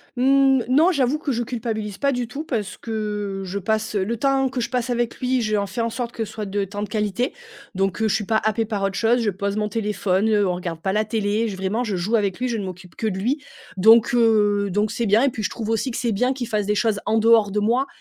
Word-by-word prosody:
Mmh, 270 0 +4
non, 310 +8 +5
j'avoue 280 -3 +1
que 300 -2 -3
je 240 - -1
culpabilise 220 -4 -4
pas 280 -1 +1
du 245 -2 -2
tout. 285 +6 -6
Parce 220 - -3
que 210 -3 -4
je 190 +2 -4
passe, 220 +3 -1
heu, 195 - +2
le 230 +4 -2
temps 270 +2 +2
que 255 -1 -3
je - - -2
passe 250 -1 -1
avec 240 -1 -1
lui, 255 0 +1
j'en 215 -2 0
fais 195 +5 -3
en 230 - 0
sorte 235 +1 -4
que 225 - -3
ce 215 - -8
soit 215 -1 -5
de 200 0 -2
temps 205 +2 -5
de 210 - -5
qualité. 215 +4 -1 0.4
Donc, 195 +1 0
heu, 220 - +3
je 215 - +1
suis 210 - -1
pas 220 +1 +2
happée 220 +1 +1
par 210 -2 -3
autre 195 0 -1
chose. 235 +4 +2
Je 220 - +1
pose 200 +2 -3
mon 210 0 -1
téléphone, 210 -2 0
heu, 205 -2 +3
on 180 - 0
regarde 170 -2 -5
pas 190 0 -1
la 215 - +2
télé, 215 +1 0
j 205 - -4
vraiment 195 +5 -1
je 215 -5 -2
joue 190 +6 0
avec 200 -3 0
lui, 255 - 0
je 235 -2 -1
ne 205 - -4
m'occupe 180 -1 -9
que 220 - -2
de 195 -3 -2
lui. 255 +10 -1 0.4
Donc, 225 +6 +6
heu, 210 -4 +3
donc 205 +3 0
c'est 235 - -2
bien 215 +5 +4
et 280 - +4
puis, 230 - -6
je 170 - 0
trouve 225 -2 -5
aussi 225 +4 0
que - - -4
c'est 240 -2 0
bien 250 +5 +1
qu'il 255 -3 -5
fasse 210 -2 -1
des 210 - +1
choses 215 -1 +1
en 220 - +2
dehors 225 -2 +4
de 210 - 0
moi, 240 +6 +1
220 Hz, 280 wpm, -22 LUFS, 205-240 Hz, 0.4 s, Donc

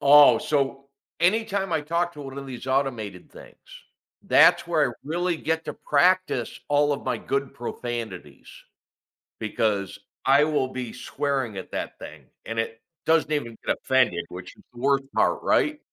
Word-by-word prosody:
Oh, 145 +1 +8
so 140 -2 -1 0.3
anytime 195 0 +1
I 160 - +2
talk 170 +3 -1
to 150 - -10
one 135 0 -7
of 140 - -7
these 130 0 -8
automated 120 -9 -2
things, - - -14 0.7
that's - - +5
where - - +2
I - - -9
really 175 +3 -1
get 160 +1 -2
to - - -4
practice 175 -5 +1
all 145 0 +3
of 140 - -4
my 125 -2 0
good 140 +3 -3
profanities 115 - -6 0.9
because 105 -3 -1 0.3
I 140 +2 +6
will 150 -4 +1
be 130 -3 -6
swearing 130 -3 -2
at 95 - -7
that - - -4
thing. 75 -3 -10 0.2
And 115 0 -3
it 115 0 -3 0.2
doesn't 160 -1 +3
even 115 -7 -2
get - - +1
offended, 125 -10 +2
which 90 0 -9
is - - -20
the 120 - -12
worst 135 +1 +2
part, - - +2
right? 300 0 +2
135 Hz, 160 wpm, -25 LUFS, 115-150 Hz, 0.9 s, Oh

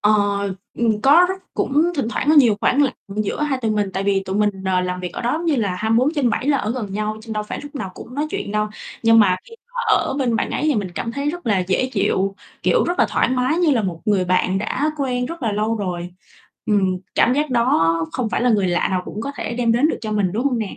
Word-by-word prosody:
Ờ, 210 +1 +4 0.6
ừm, 225 -3 +1
có 310 +7 +6
rất 380 - -1 0.2
cũng 285 +3 +2
thỉnh 275 -7 -1
thoảng 245 - -2
có 315 - +5
nhiều 240 -8 +6
khoảng 280 +3 +3
lặng 275 - +1 0.2
giữa 215 +7 -1
hai 280 -3 0
tụi 220 - +1
mình, 210 -2 0
tại 190 - -2
vì 195 -1 +1
tụi 190 +1 -3
mình, 210 0 +3
ờ, 185 -1 +2
làm 180 0 -3
việc 180 -1 -5
ở - - -5
đó 240 - 0
giống 325 +3 -2
như 310 -4 +2
là 205 -6 0
24/7 240 - +1
là 285 - +4
ở 215 - -2
gần 220 -6 -4
nhau, 215 +1 -2
trên 225 - -7
đâu 215 -1 -2
phải 210 - -6
lúc 290 +1 -10
nào 195 -9 -4
cũng 245 - -10
nói 295 +2 -1
chuyện 205 - -4
đâu. 210 0 0 0.3
Nhưng 225 0 +6
mà 190 -4 +5
khi 460 - -14 0.2
mà 485 - -1 0.2
ở - - -1
bên 245 -4 +1
bạn - - -1
ấy - - -2
thì 305 -2 +2
mình 200 -5 -2
cảm 230 +5 -3
thấy 280 +2 -1
rất 350 -3 -8
là 210 -4 +2
dễ 185 +7 0
chịu, 195 -1 0 0.3
kiểu, - - +3
rất 350 +1 -2
là - - +4
thoải - - +1
mái, 255 +5 +1
như 345 -4 +3
là 235 -5 +2
một 175 -4 -3
người 205 -4 +2
bạn 185 +1 +1
đã 265 +9 -1
quen 250 -3 -1
rất 335 -3 -7
là 225 - 0
lâu 215 +2 0
rồi. 180 -3 -4 0.6
Ừm, 190 -3 +2 0.2
cảm 240 - +4
giác 295 0 0
đó 235 -10 +3 0.2
không 250 -4 -1
phải - - 0
là 250 - +3
người 205 -4 +2
lạ 175 0 +1
nào 185 -1 0
cũng 210 - -6
có 280 - -3
thể - - -4
đem 235 -1 +1
đến 250 +6 +3
được - - -2
cho 215 -1 -4
mình, 200 -4 +1
đúng 230 +6 -1
hông 260 -4 +1
nè? 215 -4 -4
225 Hz, 270 wpm, -21 LUFS, 200-270 Hz, 0.6 s, có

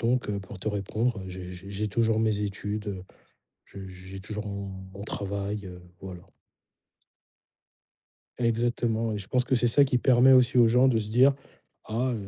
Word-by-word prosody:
Donc 120 0 0
heu, 100 - -1
pour 95 +1 -10
te 95 - -3
répondre, 110 +4 -1
heu, - - -8
j'ai 90 0 -8
j'ai 95 +2 -10
j'ai 105 +2 -2
toujours 110 +1 +1
mes 110 -2 +1
études, 105 +1 -3
heu, 95 -2 -5 0.6
j'ai 95 -1 -10
j'ai 95 +1 -9
toujours 105 +1 -5
mon 100 0 -5 0.3
mon 100 - -8
travail, 100 0 -4
heu, 90 -1 -10 0.2
voilà. 90 -2 -8 2.2
Exactement 115 -1 0
et - - -2
je 95 - -7
pense 125 -1 +1
que 130 - +1
c'est 120 0 +3
ça, 140 +5 +6
qui 130 -2 +1
permet 125 +1 +5
aussi 125 -1 +5
aux 120 -1 +7
gens 125 +3 +4
de 120 -4 +3
se 105 -1 -4
dire: 130 +5 +5 0.5
«Ah» 120 +3 -1
110 Hz, 180 wpm, -27 LUFS, 100-120 Hz, 2.2 s, aux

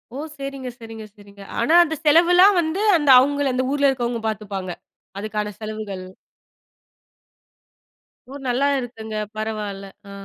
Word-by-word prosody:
ஓ! - - -5 0.2
சரிங்க, 275 -2 -6
சரிங்க, 225 -1 -9
சரிங்க. 200 -1 -16 0.2
ஆனா, 285 +8 +2
அந்த 320 -1 -3
செலவுலாம் 355 +5 +6
வந்து, 330 +5 -2 0.2
அந்த 295 -3 0
அவங்கள 285 0 +1
அந்த 255 +1 0
ஊர்ல 285 -1 +3
இருக்கறவங்க 240 -3 -2
பாத்துப்பாங்க? 195 -3 -5 0.5
அதுக்கான 210 0 -4
செலவுகள். 215 -3 -6 2.3
ஊர் 280 0 -9
நல்லா 265 +4 +1
இருக்குங்க. 220 -3 -7 0.2
பரவால்ல. 210 -2 -4 0.2
அ. - - -10
240 Hz, 125 wpm, -22 LUFS, 215-285 Hz, 2.3 s, செலவுலாம்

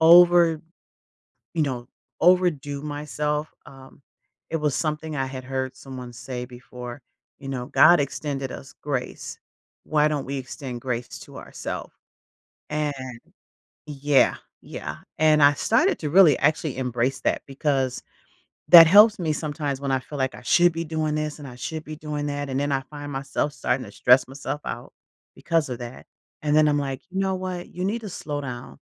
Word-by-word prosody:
over 170 -1 +7 0.9
you 160 - +2
know, 125 -3 -3 0.3
overdo 155 -6 +2
myself, 150 0 -2 0.2
um, 135 0 -15 0.5
it 165 - 0
was 150 -2 0
something 155 -1 -2
I 135 0 -1
had 130 -1 -6
heard 130 0 -3
someone 125 -2 -9
say 125 0 -6
before, 125 0 -10 0.4
you 135 - -9
know, 125 -2 -4
"God 165 +3 +6
extended 135 0 -3
us 135 - -10
grace. 135 -4 -4 0.5
Why 150 0 +2
don't 145 -2 -2
we 140 0 -3
extend 130 -1 -7
grace 125 -2 -4
to - - -11
ourself?" - - -6 0.8
And 150 -1 0 0.9
Yeah, 145 -1 +2 0.3
yeah, - - -7 0.2
and 155 -1 +4
I 145 0 +7
started 315 - +2
to 150 -3 -3
really, 170 -6 +7
actually, 150 -2 +1
embrace 125 +1 -1
that - - 0
because 135 -2 -1 0.7
that 165 -2 +11
helps 210 +4 +7
me 160 -3 0
sometimes 145 -3 -3
when 140 -1 -1
I 130 - +2
feel 145 +2 -8
like 130 0 -1
I - - -12
should 175 +6 +4
be 165 +1 -3
doing 155 -1 -1
this 155 0 -3
and 140 - -8
I 125 - -11
should 155 +5 -5
be 155 0 -7
doing 150 -1 -4
that, 145 -1 -3
and 130 - -1
then 145 0 -1
I 135 - +1
find 145 +1 -9
myself 135 +2 -2
starting 130 - -1
to - - -12
stress 125 +1 +5
myself 135 +1 -5
out, - - -6 0.4
because 165 -4 0
of 125 - -4
that, 120 +1 -8 0.4
and 150 0 +2
then 155 0 +6
I'm 145 0 +2
like, 135 -1 -3
"You 190 +1 -2
know 190 -1 0
what? 185 -1 -5
You 180 +1 -4
need 220 +4 -1
to 210 - -6
slow 145 -4 -4
down. 120 -2 -7
145 Hz, 175 wpm, -24 LUFS, 130-155 Hz, 0.9 s, that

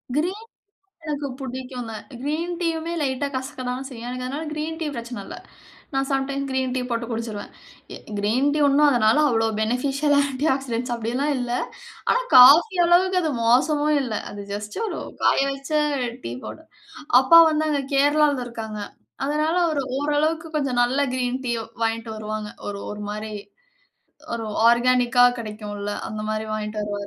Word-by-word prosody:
Green 365 +8 -1
tea - - -71 0.5
எனக்கு 295 -2 -3
புடிக்குங்க, 255 -3 -6 0.3
green 325 +5 -2
டீயுமே 330 -1 -1
லைட்டா 275 0 -1
கசக்கதான 260 -1 -4
செய்யும், 240 -3 -8
எனக்கு 250 0 -4
அதனால 285 +5 -4
கிரீன் 310 +1 -4
டீ 320 - -1
பிரச்சன 235 +1 -6
இல்ல. - - -8 0.6
நான் 270 0 +1
சம் 270 -1 +1
டைம் 275 0 -2
கிரீன் 260 -1 -1
டீ 260 - 0
போட்டு 235 0 -1
குடிச்சுருவேன். 225 -3 -4 0.5
எ - - -7 0.2
கிரீன் 235 +8 +2
டீ - - 0
ஒண்ணும் 290 +1 +5
அதனால, 220 -4 +3
அவ்ளோ 225 -1 +2
ஃபெனிஃபிஷியல் 270 +6 +1
ஆ - - +6
ஆன்டி 275 +2 -2
ஆக்சிடெட்ஸ் 250 -2 -3
அப்பிடியெல்லாம் 245 +6 -1
இல்ல. 245 -1 -3 0.6
ஆனா - - +3 0.2
காஃபி 295 - +8
அளவுக்கு 365 +2 +4
அது 315 - 0
மோசமும் 295 +6 +3
இல்ல. 240 -5 -4 0.2
அது 205 - -8
ஜஸ்ட் 205 0 -5
ஒரு 415 - -4 0.2
காய - - +4
வச்ச 275 +2 -7 0.5
டீ 115 - -4
பவுடர். 320 0 -9 0.5
அப்பா 300 +6 +7
வந்து 310 0 0
அங்க 290 -2 0
கேரளாவுல 290 -1 +3
இருக்காங்க. 220 -3 -6 0.5
அதனால 305 +3 0
அவரு 305 -4 0 0.2
ஓரளவுக்கு 305 +3 0
கொஞ்சம் 270 -4 0
நல்ல 250 +3 +1
கிரீன் 255 0 -1
டீயோ 235 -2 -1 0.2
வாங்கிட்டு 225 0 -2
வருவாங்க. 215 0 -4 0.2
ஒரு, 200 -1 -4
ஒரு 210 0 -7
மாரி, 215 +1 -5 1.0
ஒரு 225 -1 -4 0.2
ஆர்கானிக் 245 0 +2
கா 245 - +9
கிடைக்கும்ல, 210 -2 -5 0.2
அந்தமாரி 215 0 -3
வாங்கிட்டு 210 0 -4
வருவாரு. 205 -1 -4
255 Hz, 155 wpm, -23 LUFS, 230-295 Hz, 1.0 s, கா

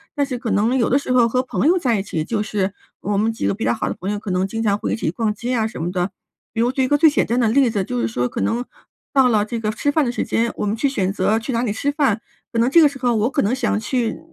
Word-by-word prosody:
但 285 - +1
是 255 -3 -4
可 235 -2 -3
能 230 +6 +2
有 235 - +2
的 265 - +4
时 280 -2 -3
候 245 -2 +5
和 255 +2 0
朋 260 - 0
友 365 +2 +4
在 240 - +1
一 - - -2
起， 160 -5 -3
就 215 +4 -2
是 205 -2 -1 0.3
我 205 0 -1
们 220 +2 +2
几 - - -4
个 - - +1
比 225 - -5
较 - - +2
好 220 - -2
的 - - -3
朋 190 - -4
友， 205 - -2
可 205 -2 -5
能 180 +1 +1
经 225 +3 -3
常 205 -2 +2
会 - - -2
一 - - +1
起 165 - -2
逛 215 +2 -1
街 240 +4 -3
啊 225 -2 +1
什 220 - -7
么 175 - -2
的。 180 +1 -1 0.4
比 225 - 0
如 245 +2 +2
举 265 0 0
一 - - +1
个 290 - +3
最 315 +1 +6
简 290 - +1
单 235 - -1
的 235 - +3
例 260 +1 +4
子， 205 -4 -1
就 125 -8 -3
是 115 - 0
说 120 +2 -1
可 - - -5
能 235 +2 0 0.5
到 270 -2 +5
了 210 -3 +3
这 230 +1 -4
个 215 - -2
吃 285 +6 -1
饭 305 0 +2
的 240 - 0
时 - - -1
间， 230 +1 0
我 - - -2
们 205 - 0
去 280 - +1
选 195 -8 0
择 215 +2 +1
去 245 +4 -5
哪 230 - +1
里 230 -4 -1
吃 280 +6 -1
饭， 275 -7 +1 0.3
可 230 - 0
能 235 - +3
这 335 - +7
个 300 - +7
时 280 - -6
候 245 -1 +1
我 220 +4 +1
可 280 - 0
能 210 - +1
想 250 - 0
去 235 +1 -1
230 Hz, 355 characters per minute, -20 LUFS, 205-255 Hz, 0.5 s, 这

